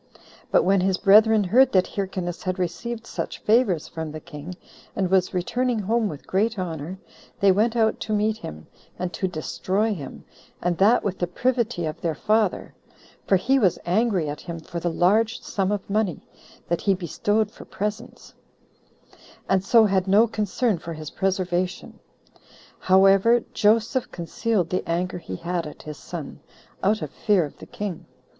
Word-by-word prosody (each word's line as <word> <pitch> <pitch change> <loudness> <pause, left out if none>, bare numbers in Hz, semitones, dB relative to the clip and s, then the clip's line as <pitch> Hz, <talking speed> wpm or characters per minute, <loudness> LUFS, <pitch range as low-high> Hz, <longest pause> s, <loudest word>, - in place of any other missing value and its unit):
But - - +4
when 195 0 +3
his 190 0 +1
brethren 215 +2 +6
heard 245 +8 +4
that 185 -1 +4
Hyrcanus 185 -3 -4
had 185 0 -2
received 220 +7 -4
such - - -5
favors 210 -8 +2
from 160 -2 -6
the 155 - -7
king, 160 +2 -9 0.4
and 190 -2 -1
was 185 -1 +3
returning 240 +7 -1
home 220 +1 0
with 150 -2 -9
great 215 +4 0
honor, 170 -1 -4 0.4
they 195 -1 +5
went 220 +5 +2
out 220 -2 +2
to 220 - -5
meet 215 +1 +1
him, 75 - -9 0.3
and 180 -1 -4
to 190 - -1
destroy 190 +5 -1
him, 145 -8 -9 0.3
and 175 0 0
that 215 +5 +5
with 190 -2 -3
the 175 - 0
privity 235 -1 -1
of 155 +2 -5
their 165 -2 -1
father; 215 +3 0 0.5
for 195 - +4
he 260 +9 +2
was 190 -8 +3
angry 190 -3 +1
at 145 +1 -5
him 170 -1 -6
for 170 +2 -6
the 175 - -1
[large] 215 +8 +2
sum 195 -1 -1
of 205 -2 -3
money 205 -3 -1 0.4
that 170 - -1
he 195 -2 +2
bestowed 205 +4 -1
for - - -13
presents, 210 +3 -5 1.1
and 190 -1 +2
so 225 +2 +5
had 190 -2 +1
no 205 +4 +5
concern 215 -1 -1
for 165 +1 -7
his 155 -1 -8
preservation. 185 -1 -2 0.8
However, 195 +5 +5
Joseph 225 +4 +2
concealed 180 +2 -1
the 185 - 0
anger 180 +2 -1
he 95 - -7
had 170 - -3
at 150 - -11
his 150 -1 -8
son, 160 -6 -8 0.4
out 210 +2 +1
of - - -6
fear 200 -6 +2
of 145 - -11
the - - -11
king. 200 -5 -6
190 Hz, 170 wpm, -24 LUFS, 175-215 Hz, 1.1 s, brethren